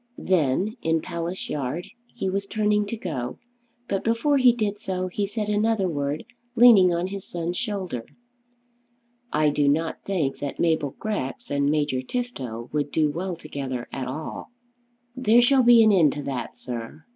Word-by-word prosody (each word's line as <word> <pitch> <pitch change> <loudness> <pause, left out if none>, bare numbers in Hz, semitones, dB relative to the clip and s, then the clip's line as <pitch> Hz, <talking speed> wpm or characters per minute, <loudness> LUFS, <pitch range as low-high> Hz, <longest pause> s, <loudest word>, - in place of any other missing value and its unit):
Then 185 - +1
in 165 0 +1
Palace 170 +2 -4
Yard 145 +4 -3 0.3
he - - -2
was 195 +1 -2
turning 210 -1 +1
to 230 - -4
go, 135 - -4 0.5
but 195 - -1
before 230 +6 +2
he 255 -2 +6
did 210 -3 -2
so, 185 -2 -3
he 200 +2 -2
said 210 +1 -3
another 210 -1 +1
word 145 -2 -2 0.3
leaning 225 -7 +7
on 170 +1 0
his 195 0 -5
son's 175 0 -3
shoulder. 190 - -3 1.2
"I 150 -1 +3
do 145 0 +1
not 160 +3 0
think 170 -9 -1
that 145 -1 -5
Mabel 160 -5 +1
Grex 205 -14 -4
and 140 0 +2
Major 145 -4 +1
Tifto 130 - -4
would 145 -1 -1
do 155 -2 +2
well 180 +3 -3
together 135 -6 -5
at 130 -2 -3
all." 150 +5 -6 0.7
"There 240 -2 +4
shall 265 +2 +5
be 240 -2 +7
an 215 - +6
end 170 -7 +4
to 145 - -5
that, 130 -4 -4
sir." 120 +5 -7
175 Hz, 165 wpm, -25 LUFS, 145-210 Hz, 1.2 s, leaning